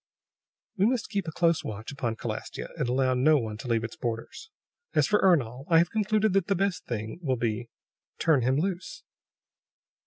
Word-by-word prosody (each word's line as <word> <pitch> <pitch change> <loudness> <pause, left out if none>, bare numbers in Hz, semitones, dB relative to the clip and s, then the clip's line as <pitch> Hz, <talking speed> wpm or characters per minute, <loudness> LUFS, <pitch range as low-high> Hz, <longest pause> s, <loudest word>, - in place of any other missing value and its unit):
"We 195 +2 +4
must 245 -4 -1
keep 200 -4 -2
a - - -2
close 165 0 +2
watch 110 +3 -6
upon 125 -5 -2
Calastia, - - -5
and 120 - -1
allow 130 +1 +2
no 145 +5 +4
one 110 -5 -3
to 125 - -8
leave 115 -2 +1
its 115 - -5
borders. 120 - -5 0.5
As - - +4
for 210 - +3
Ernol, 135 -8 +2
I 165 - +6
have 170 +1 +3
concluded 215 -1 +1
that 195 -3 +2
the 200 - +2
best 195 0 -1
thing 110 +4 -4
will 130 -6 0
be 115 0 -2 0.5
turn 155 -5 +3
him 130 +3 +2
loose!" 190 - -3
145 Hz, 185 wpm, -28 LUFS, 120-190 Hz, 0.5 s, I